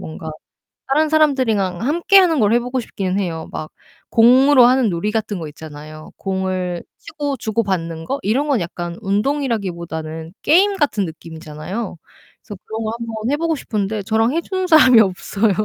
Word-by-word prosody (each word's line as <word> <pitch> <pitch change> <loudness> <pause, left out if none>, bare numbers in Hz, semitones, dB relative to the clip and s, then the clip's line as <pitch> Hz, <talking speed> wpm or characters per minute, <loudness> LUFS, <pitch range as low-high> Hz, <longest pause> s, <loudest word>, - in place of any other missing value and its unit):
뭔가 160 0 -7 0.6
다른 305 +3 +2
사람들이랑 250 - +1
함께 340 - +3
하는 335 -6 +3
걸 210 +1 +3
해 240 - +4
보고 250 +2 -3
싶기는 195 -4 -3
해요. 165 -4 -4
막 155 - -6 0.4
공으로 255 +3 +6
하는 250 -3 +3
놀이 175 +4 -2
같은 215 -3 -2
거 160 - -5
있잖아요. 155 0 -11
공을 185 -2 -3 0.2
치고 285 -2 -4
주고 225 0 -1
받는 165 -4 -3
거? 275 +10 -3
이런 260 +9 0
거는 270 -8 +1
약간 170 0 -5
운동이라기 220 0 -1
보다는 160 -1 -7
게임 390 +6 +4
같은 280 - +1
느낌이잖아요. 160 +5 -7 0.4
그래서 205 -3 -10
그런 220 +1 -5
거 220 - -2
한번 230 -1 -6 0.2
해 290 - +1
보고 330 0 0
싶은데 210 -5 -3
저랑 225 +4 +1
해 335 - 0
주는 375 0 -3
사람이 260 -8 +7
없어요. 200 +2 0
215 Hz, 365 characters per minute, -19 LUFS, 175-270 Hz, 0.6 s, 사람이